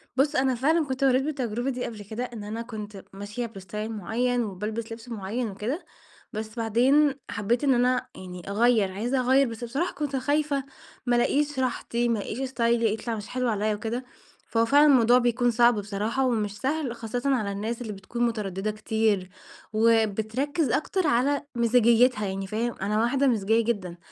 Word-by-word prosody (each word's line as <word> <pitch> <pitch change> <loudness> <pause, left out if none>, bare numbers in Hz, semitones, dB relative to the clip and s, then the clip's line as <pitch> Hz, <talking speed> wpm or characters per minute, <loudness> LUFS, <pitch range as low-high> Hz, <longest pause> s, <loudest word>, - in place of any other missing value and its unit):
بُصّ، 275 +3 +2
أنا 260 -1 +2
فعلًا 310 +5 +2
كنت 265 0 -3
مريت 265 0 +4
بالتجربة 255 -4 -2
دي 250 -1 -3
قبل 215 -3 -7
كده، 220 +4 -5
إن 235 -4 -6
أنا 215 +2 -4
كنت 210 -4 -8
ماشية 205 +5 -5
باستايل 210 0 -6
معيّن، 240 +4 0
وبالبس 215 +3 -4
لبس 225 +1 -9
معيّن 225 +2 -3
وكده. 220 - -4 0.5
بس 220 +1 -5
بعدين 260 +6 +4 0.2
حبيت 225 +6 0
إن 275 -2 +4
أنا، 250 +1 +2
يعني، 180 -1 -9
أغيّر، 215 -1 +3
عايزة 240 +7 -1
أغيّر، 260 +2 +4
بس 230 +1 -7
بصراحة 275 +10 -2
كنت 285 -1 -3
خايفة 285 +1 0 0.4
ما 245 -1 +2
ألاقيش 285 +3 +1
راحتي، 240 -1 -1
ما 230 -3 +1
ألاقيش 215 +4 -5
استايلي 235 -4 +1
يطلع 225 +1 -3
مش 210 0 -7
حلو 250 -1 -1
عليَّ 215 0 0
وكده. 230 +4 -4 0.4
فهو 230 0 +2
فعلًا 285 +5 +6
الموضوع 250 -4 +6
بيكون 245 0 +2
صعب 235 0 +5
بصراحة، 215 +6 -1
ومش 210 -4 -1
سهل، 270 -3 -1
خاصةً 230 +1 -4
على 210 -5 -1
الناس 220 +4 -3
اللي 220 -3 -4
بتكون 200 +5 -4
مترددة 210 -3 -2
كتير، 215 -3 0 0.4
وبتركز 225 - +1
أكتر 310 +7 0
على 280 +2 +2
مزاجيتها، 235 -1 +4
يعني 195 0 -3
فاهم؟ 230 +3 -2
أنا 210 +2 0
واحدة 270 +4 +2
مزاجية 225 -1 +2
جدًا، 195 -7 -2
235 Hz, 170 wpm, -26 LUFS, 215-255 Hz, 0.5 s, فعلًا